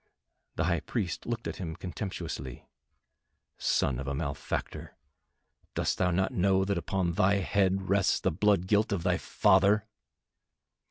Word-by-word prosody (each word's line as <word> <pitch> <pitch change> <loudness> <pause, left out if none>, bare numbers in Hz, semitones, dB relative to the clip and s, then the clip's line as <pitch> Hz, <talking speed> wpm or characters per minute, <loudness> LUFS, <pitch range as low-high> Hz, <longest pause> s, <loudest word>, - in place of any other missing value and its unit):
The - - 0
High - - +1
Priest 95 -7 -3
looked 115 -1 -3
at - - -5
him 80 -4 -5
contemptuously. 90 - -6 0.9
"Son 65 -3 +1
of 70 - -5
a 70 - -2
malefactor, 70 -2 -4 0.8
dost - - 0
thou 90 - +3
not 95 +2 +1
know 95 +1 +2
that 100 0 0
upon 90 +1 -1
thy 95 +4 +3
head 95 -1 +1
rests 100 0 +2
the - - 0
blood 100 +1 +2
guilt 105 +4 +2
of 95 -5 -1
thy 90 -1 +2
father?" 105 +1 +3
95 Hz, 145 wpm, -29 LUFS, 85-100 Hz, 0.9 s, thou